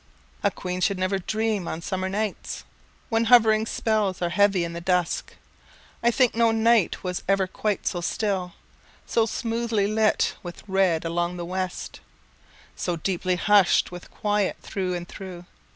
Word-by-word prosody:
A - - +3
queen 180 0 -5
should 200 0 +2
never 185 +1 0
dream 215 -1 -1
on 160 - -3
summer 190 0 -2
nights, 210 +1 -3 0.5
When 225 0 +2
hovering 220 -2 +5
spells 215 -6 0
are 175 - 0
heavy 195 0 +3
in 170 0 -4
the 170 - -5
dusk: 180 -1 0 0.7
I 235 - +4
think 250 0 +3
no 230 0 +3
night 225 -1 +2
was 180 -1 -3
ever 195 0 +3
quite 205 +2 -2
so 175 - -1
still, 185 -1 -1 0.5
So 230 -1 +1
smoothly 230 -2 -1
lit 215 +1 +2
with 175 -2 -9
red 190 -4 +2
along 175 +1 -1
the 175 - -4
west, 185 0 -4 0.8
So 175 - -2
deeply 180 +2 -1
hushed 200 -1 +4
with 180 0 -9
quiet 205 -2 0
through 185 -2 -2
and 175 0 -5
through. 180 -2 -9
195 Hz, 155 wpm, -25 LUFS, 180-215 Hz, 0.8 s, hovering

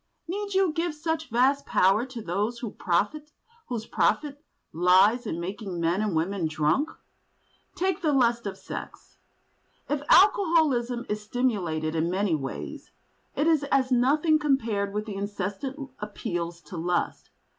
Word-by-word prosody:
Need 400 +2 -4
you 380 -4 +3
give 335 -1 -1
such 320 +1 -3
vast 265 +5 +2
power 195 +7 +3
to 245 -4 -8
those 205 +7 -1 1.1
whose 235 -4 -4
profit 285 +7 0 0.3
lies 190 +8 +4
in 165 - -3
making 190 0 -5
men 170 +4 +1
and 210 -5 -1
women 170 +1 0
drunk? 155 - +1 0.9
Take 375 +1 -1
the 310 -4 +2
lust 235 -4 +2
of 195 - -5
sex. - - -9 0.7
If 295 -1 -1
alcoholism 315 - +4
is 210 0 -2
stimulated 195 -10 -1
in 165 +1 0
many 190 0 0
ways, 135 -3 -5 0.5
it 295 - +1
is 320 -3 +3
as 270 -2 +1
nothing 295 +6 +3
compared 230 -9 0
with 210 +1 -3
the 215 - -6
incessant 205 +8 -4
appeals 175 -5 -4
to 155 +3 -9
lust. 175 +1 -2
230 Hz, 135 wpm, -26 LUFS, 185-285 Hz, 1.1 s, lies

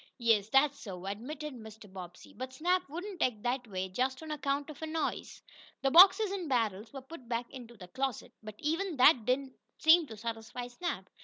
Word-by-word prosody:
"Yes, 225 -4 +2
that's 275 +3 +3
so," 185 -4 -8
admitted 275 +9 -5
Mr. 220 -2 -11
Bobbsey. 180 -2 -11
"But 260 +1 -6
Snap 360 +3 0
wouldn't 360 +5 -7
act 220 -5 0
that 245 0 -1
way 190 -2 -3
just 260 +9 -2
on 315 - -7
account 285 0 -2
of 300 - -13
a 320 - -3
noise." 320 0 -3 0.4
The 270 - +2
boxes 380 +5 +8
and 370 -6 -4
barrels 220 -4 -1
were 270 - -8
put 265 -4 -12
back 235 0 -2
into 240 -3 -11
the 180 -2 -11
closet, 260 +5 -3
but 215 -1 -9
even 330 +2 -2
that 250 -3 +6
did 255 +2 +3
not 270 -1 -11 0.3
seem 320 0 +6
to 220 - -10
satisfy 230 +2 -6
Snap. 245 - -4
255 Hz, 200 wpm, -31 LUFS, 220-305 Hz, 0.4 s, boxes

